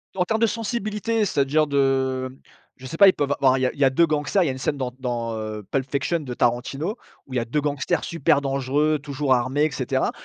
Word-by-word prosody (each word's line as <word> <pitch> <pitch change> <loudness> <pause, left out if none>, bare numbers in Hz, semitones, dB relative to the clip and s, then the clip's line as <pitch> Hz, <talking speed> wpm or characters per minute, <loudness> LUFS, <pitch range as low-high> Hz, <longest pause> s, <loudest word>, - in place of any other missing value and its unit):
En 180 - +2
termes 220 +3 0
de 230 - +5
sensibilité 225 0 -2
c'est-à-dire 150 -2 +1
de 135 -2 +1 0.5
je 130 - -13
sais 165 - -6
pas 200 - +8
ils 185 - +6
peuvent 145 -1 -1
av - - 0
enfin 130 -1 +4
il - - -2
y 130 - +2
a - - +1
il - - -16
y 140 - +5
a - - +5
2 170 +6 +3
gangsters 155 +4 +1
il - - 0
y - - +1
a - - 0
une 130 - -6
scène 145 - -1
dans 130 -3 -3
dans, 120 -2 -3
heu, 110 -1 -5
Pulp 135 -1 -1
fiction 145 +5 0
de 135 -5 -6
Tarantino 135 - -1 0.3
où 135 - -10
il 130 - 0
y - - +3
a 115 - -2
2 145 +6 -1
gangsters 145 +3 -1
super 145 -3 +1
dangereux 140 +2 0
toujours 140 -2 0
armés 130 +4 +1
et 155 - -1
cetera 130 -1 -1
140 Hz, 265 wpm, -23 LUFS, 130-155 Hz, 0.5 s, pas